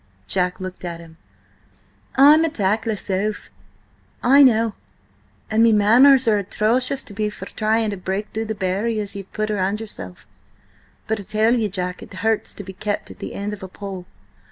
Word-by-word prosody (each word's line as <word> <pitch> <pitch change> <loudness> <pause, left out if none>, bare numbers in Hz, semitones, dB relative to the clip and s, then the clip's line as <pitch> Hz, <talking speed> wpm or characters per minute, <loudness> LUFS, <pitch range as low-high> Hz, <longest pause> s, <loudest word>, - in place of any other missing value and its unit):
Jack 180 -1 0
looked 185 0 -7
at 170 -1 -5
him. 165 -1 -14 1.0
"Oh, 280 +2 +8
ay! - - +9
I'm 315 +1 +4
a 325 - +1
tactless 215 -3 -1
oaf, 205 +3 -2 0.7
I 275 +4 +6
know, 230 -4 +4 0.8
and 220 +1 +3
me 230 0 +6
manners 240 +5 +6
are 210 -2 +4
atrocious 245 +7 0
to 205 - -12
be 210 +1 -1
for 210 - -8
trying 220 0 0
to 200 - -5
break 190 +3 -3
through 220 +1 -2
the 220 0 -4
barriers 205 +2 -2
ye've 195 -1 -8
put 215 0 -2
up 210 - -1
round 195 +2 0
yourself. 90 - -8 0.8
But, 220 0 -1
I - - -6
tell 220 +4 +2
ye, 220 -3 0
Jack, 180 -2 -4
it - - -11
hurts 220 +2 -1
to 205 - -8
be 190 0 -9
kept 205 +2 -4
at - - -14
the - - -7
end 205 +1 -4
of 210 - -8
a 190 - -6
pole! 190 -1 -8
210 Hz, 195 wpm, -21 LUFS, 190-225 Hz, 1.0 s, ay